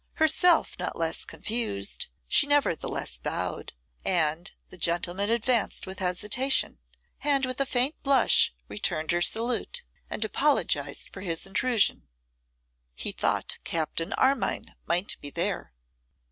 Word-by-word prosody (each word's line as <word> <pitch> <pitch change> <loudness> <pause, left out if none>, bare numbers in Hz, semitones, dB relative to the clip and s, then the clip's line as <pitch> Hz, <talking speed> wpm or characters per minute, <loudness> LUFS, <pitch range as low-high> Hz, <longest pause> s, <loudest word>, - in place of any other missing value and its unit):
Herself 315 +2 +3
not - - -3
less - - +1
confused, 215 - -1 0.2
she 285 - +4
nevertheless 280 - 0
bowed, - - -4 0.3
and 165 -1 +1 0.2
the 185 - -10
gentleman 175 +4 +1
advanced 235 0 +1
with 190 +1 -8
hesitation, 210 +9 +1 0.4
and 280 -2 +2
with 255 +1 -2
a 275 - +1
faint 260 +4 0
blush 270 -3 +5 0.2
returned 155 - -1
her 175 0 +1
salute, 240 - 0 0.3
and 220 - -2
apologised 285 +7 0
for - - -8
his 165 -4 +1
intrusion. 215 - 0 0.9
'He - - -2
thought - - -2
Captain 165 0 -1
Armine 265 -1 0
might 175 +4 +1
be 145 - -6
there. - - -3
210 Hz, 120 wpm, -27 LUFS, 170-265 Hz, 0.9 s, blush